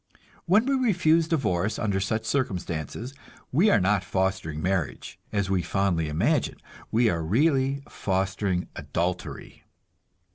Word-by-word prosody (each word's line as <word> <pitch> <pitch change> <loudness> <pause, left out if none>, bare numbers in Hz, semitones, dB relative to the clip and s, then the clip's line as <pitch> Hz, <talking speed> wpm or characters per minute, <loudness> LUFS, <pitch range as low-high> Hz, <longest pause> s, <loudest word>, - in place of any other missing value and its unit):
When 210 +7 +4
we 275 - +1
refuse 175 -11 +3
divorce 110 - 0
under 100 -4 0
such 110 +3 -1
circumstances 105 - -2 0.4
we 175 +11 +4
are 115 - +5
not 100 +1 +2
fostering 95 -5 -1
marriage, 90 -2 -2
as 100 -2 0
we 95 -1 +1
fondly 85 -3 0
imagine; 120 - +1 0.3
we 115 +1 +3
are 85 -1 -1
really 135 - +2
fostering 95 -1 -1
adultery. 90 +2 -4
100 Hz, 120 wpm, -26 LUFS, 90-140 Hz, 0.4 s, are